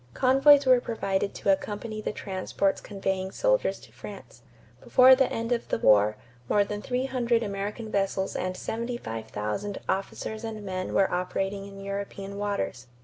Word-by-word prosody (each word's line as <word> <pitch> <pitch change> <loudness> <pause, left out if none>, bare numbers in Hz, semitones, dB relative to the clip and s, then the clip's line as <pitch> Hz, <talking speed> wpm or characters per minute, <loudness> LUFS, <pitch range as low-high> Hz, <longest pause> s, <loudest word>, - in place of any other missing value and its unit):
Convoys 275 +2 +6
were 255 -1 +6
provided 200 -4 -2
to 200 - +2
accompany 215 +2 -2
the - - -2
transports 195 -1 -1
conveying 190 -2 -2
soldiers - - +1
to - - -16
France. - - -11 0.4
Before 255 +1 +7
the 260 0 +3
end 230 +1 -3
of 240 -1 0
the - - 0
war 105 - +4 0.3
more 205 - +4
than 205 +1 -5
three 250 +3 -1
hundred 240 -3 +1
American 205 +2 -4
vessels 195 -1 0
and 185 0 -2
75,000 195 - -4
officers 195 +3 -3
and 215 -2 -5
men 185 -1 -3
were 195 - +3
operating 195 +2 -2
in 195 0 -11
European 200 0 -5
waters. 200 -11 -3
200 Hz, 150 wpm, -27 LUFS, 195-230 Hz, 0.4 s, Before